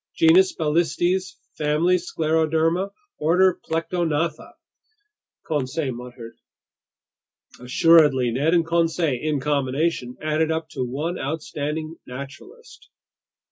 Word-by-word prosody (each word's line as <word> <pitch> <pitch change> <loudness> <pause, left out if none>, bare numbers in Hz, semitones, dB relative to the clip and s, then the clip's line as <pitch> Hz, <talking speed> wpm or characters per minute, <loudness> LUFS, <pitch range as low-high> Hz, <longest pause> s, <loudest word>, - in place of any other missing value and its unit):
"Genus 345 +2 +5
Balistes, 175 +4 0 0.2
family 155 +4 +2
Scleroderma, 160 +2 0 0.3
order 180 +4 +3
Plectognatha," 165 -1 -2 0.9
Conseil 145 -1 -2
muttered. 120 -1 -10 1.2
Assuredly, 130 -1 +4
Ned 145 +8 +1
and 165 -1 +2
Conseil 165 -5 0
in 155 -2 -1
combination 140 -1 -1
added 155 +1 0
up 160 0 -3
to 135 -4 -4
one 150 +8 -3
outstanding 155 +1 -4
naturalist. 140 - -11
160 Hz, 90 wpm, -23 LUFS, 140-170 Hz, 1.2 s, Genus